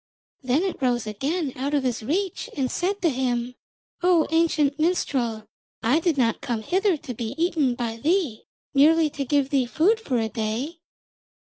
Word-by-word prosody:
Then 265 +5 +1
it 380 -6 -3
rose 245 -3 +1
again 270 - -2
out 280 +3 -1
of 280 - +1
his 245 -3 -1
reach 355 - -2
and 260 -2 0
said 395 +3 -1
to 335 - +4
him: 245 -1 -1 0.5
'O 355 -3 +4
ancient 315 -3 +2
minstrel, 250 - 0 0.4
I 250 +8 +3
did 330 -3 0
not 230 -3 +1
come 230 -3 -3
hither 375 - +1
to 260 -3 -7
be 230 +2 -5
eaten 320 -7 +1
by 235 -2 -3
thee, 305 - 0 0.3
merely 310 +2 +5
to 280 - -3
give 275 0 +1
thee 265 -3 +2
food 370 - +2
for 270 - -1
a 225 -1 0
day.' 230 +9 -3
280 Hz, 175 wpm, -24 LUFS, 240-330 Hz, 0.5 s, merely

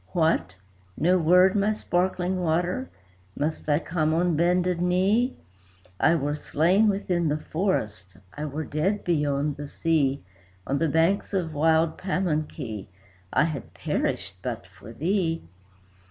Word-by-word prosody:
"What! 160 - +1 0.4
no 180 +3 +3
word, 180 +4 +5
my 205 +1 +2
Sparkling 185 -2 -1
Water? 175 +9 0 0.5
must 155 +1 -2
I 145 - +4
come 160 -1 0
on 175 0 +2
bended 175 +1 +2
knee? 195 +8 +2 0.6
I 170 - +4
were 145 -2 -1
slain 180 +9 +2
within 180 -4 0
the 150 0 +1
forest, 110 - -2 0.2
I 150 - -4
were 150 +2 -4
dead 160 +9 -1
beyond 145 -3 0
the 145 0 -6
sea; 140 -3 0 0.4
On 140 +1 -1
the 165 - +1
banks 165 +6 +1
of 170 -4 -1
wild 160 +1 +2
Pamunkey, 155 - -2 0.4
I - - +3
had 150 -6 -4
perished 95 -1 -2
but 120 -2 -4
for 95 +3 -13
thee. 165 - -1
165 Hz, 135 wpm, -26 LUFS, 145-180 Hz, 0.6 s, word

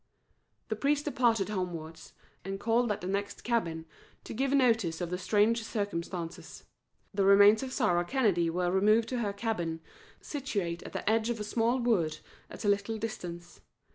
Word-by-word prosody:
The 220 - 0
priest 285 +5 +1
departed 235 -8 +2
homewards, 165 -5 -5 0.3
and 195 +1 -5
called 235 +1 +2
at 205 - -3
the 180 - -5
next 200 +1 -3
cabin 170 -9 -1 0.4
to - - -7
give 270 +4 0
notice 230 -11 +2
of 175 -1 -4
the 180 - -1
strange 220 +4 +2
circumstances. 180 -6 -5 0.5
The 200 -1 +1
remains 200 +2 +7
of 265 -1 -5
Sarah 205 -10 +2
Kennedy 185 -6 +1
were 175 +1 0
removed 215 +4 +3
to 250 - -2
her 210 -4 -1
cabin, 200 -6 -2 0.4
situate 200 - -3
at - - -10
the - - -5
edge 220 +1 +2
of 235 -2 -2
a - - -3
small 230 +3 +1
wood 215 -11 +1 0.3
at - - -8
a - - +1
little 205 +2 +1
distance. 175 -6 -7
205 Hz, 170 wpm, -30 LUFS, 175-230 Hz, 0.5 s, remains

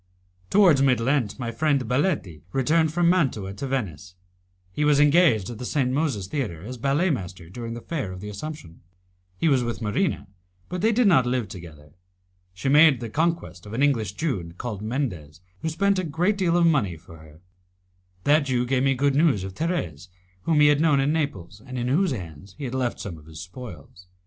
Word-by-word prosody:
Towards 180 -9 +5
mid 130 -3 +3
Lent 120 -2 0
my 120 -3 -4
friend 145 +4 +1
Baletti 125 - -1
returned 155 +4 +2
from 175 +1 +2
Mantua 135 - +1
to 135 +7 -5
Venice. 95 - -4 0.6
He 150 - -2
was 150 -1 +4
engaged 145 - +4
at 115 - -9
the - - -6
St. 125 0 0
Moses 135 - -1
Theatre 95 - -4
as 125 +4 -7
ballet 145 +8 +1
master 90 - -5
during 115 +2 -6
the 120 - -7
Fair 140 - -3
of 90 - -8
the 105 - -7
Assumption. 105 - -8 0.6
He 165 - +1
was 135 -5 +3
with 120 -1 -3
Marina, 115 - -1 0.4
but 180 0 -4
they 220 +2 +3
did 240 +2 +2
not 130 -11 +5
live 125 -3 0
together. 75 -5 -11 0.6
She 95 +8 -5
made 145 -1 +6
the 115 -3 -6
conquest 160 - -2
of 105 - -9
an 130 +5 0
English 115 -9 +1
Jew, 105 - -3
called 110 -5 -5
Mendez, 105 - -4 0.2
who 160 - -2
spent 200 +4 +1
a - - -1
great 175 +6 0
deal 175 -3 +1
of 175 - +4
money 115 - +2
for 80 +1 -14
her. 80 -1 -16 0.8
That 150 0 +4
Jew 125 -2 0
gave 130 +1 +1
me 135 0 +2
good 140 +2 +2
news 140 - +3
of 95 0 -6
Thérèse, 95 - -3 0.4
whom 155 -3 +3
he 150 - +7
had 145 0 +3
known 150 -4 +4
in 140 +3 +1
Naples, 105 - -3
and 130 0 -7
in 120 0 -1
whose 180 +8 +2
hands 90 - -7
he - - -8
had 125 -2 -4
left 130 -2 -1
some 85 -6 -6
of 75 - -18
his 80 -1 -10
spoils. 90 - -11
130 Hz, 205 wpm, -24 LUFS, 95-155 Hz, 0.8 s, he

